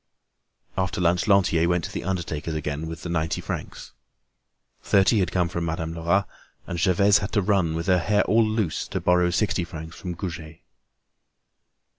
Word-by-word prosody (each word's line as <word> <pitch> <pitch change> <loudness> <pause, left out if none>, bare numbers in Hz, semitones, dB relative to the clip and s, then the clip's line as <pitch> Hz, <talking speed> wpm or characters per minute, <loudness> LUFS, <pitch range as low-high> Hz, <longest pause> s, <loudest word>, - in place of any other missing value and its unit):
After 95 +2 -1
lunch 90 +2 +2
Lantier 90 -4 +3
went 90 -1 +1
to - - -5
the - - -5
undertaker's 85 -4 -3
again 75 +1 -3
with 80 0 -7
the - - -4
ninety 80 -1 -1
francs. - - -6 0.9
Thirty 100 +3 +3
had 90 -3 0
come 90 -2 +1
from 85 0 -3
Madame 80 0 -3
Lerat 85 +4 +1 0.4
and 85 - -4
Gervaise 100 +3 +4
had 100 +2 -4
run, 95 -6 +2
with 85 +1 -3
her 90 -1 +3
hair 105 +5 +2
all 115 +1 +3
loose, 110 -5 -1
to - - -3
borrow 90 0 +3
sixty 95 0 0
francs 80 -1 -8
from 90 -2 -6
Goujet. 80 -3 -7
90 Hz, 165 wpm, -24 LUFS, 80-95 Hz, 0.9 s, Gervaise